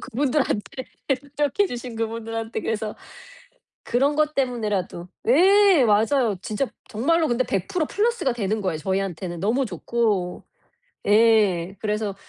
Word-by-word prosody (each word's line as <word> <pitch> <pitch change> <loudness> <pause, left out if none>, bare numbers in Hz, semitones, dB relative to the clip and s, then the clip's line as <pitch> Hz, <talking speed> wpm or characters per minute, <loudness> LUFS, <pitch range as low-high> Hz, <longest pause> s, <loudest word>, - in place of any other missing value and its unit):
그분들한테. 260 -2 -1 0.5
노력해 295 +7 +2
주신 245 -4 -6
그분들한테. 225 0 -4
그래서 220 -1 -3 0.9
그런 275 +5 +1
것 305 0 +1
때문에라도 210 -9 -2 0.2
예. 380 +2 +6
맞아요. 225 +2 +3
진짜 215 +6 -2 0.2
정말로 315 +9 +1
근데 240 +1 +1
100% 225 - -1
플러스가 435 - 0
되는 215 -2 -2
거예요, 185 -6 -2
저희한테는. 185 -1 -3
너무 225 +10 +1
좋고. 200 -2 -1 0.7
예. 205 -4 +3
그래서 210 -2 -2
225 Hz, 290 characters per minute, -23 LUFS, 205-270 Hz, 0.9 s, 예